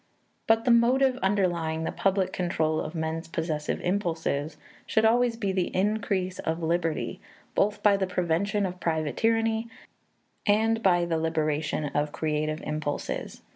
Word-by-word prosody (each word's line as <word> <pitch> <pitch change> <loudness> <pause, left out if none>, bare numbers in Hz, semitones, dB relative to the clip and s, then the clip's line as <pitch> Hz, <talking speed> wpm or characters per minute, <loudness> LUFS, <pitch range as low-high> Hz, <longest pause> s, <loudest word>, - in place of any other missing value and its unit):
But 225 0 +3
the 245 - +4
motive 255 +3 +4
underlying 175 -5 0
the - - -2
public 190 -1 0
control 160 -3 0
of 155 +3 -6
men's 160 +1 -3
possessive 160 -2 -2
impulses 165 -5 -1 0.3
should 220 0 +2
always 235 +1 +3
be 200 -4 -1
the 185 -2 0
increase 195 -2 0
of 165 +1 -2
liberty, 165 -1 -1 0.3
both 205 +1 +1
by 205 -1 +5
the 190 -1 0
prevention 180 +3 0
of 180 -1 -5
private 160 -4 -1
tyranny 225 0 +1 0.8
and 225 +2 +3
by 175 -4 +3
the 165 -1 0
liberation 155 -1 -1
of 145 +1 -1
creative 155 0 -2
impulses. 150 -1 -4
180 Hz, 140 wpm, -27 LUFS, 160-210 Hz, 0.8 s, by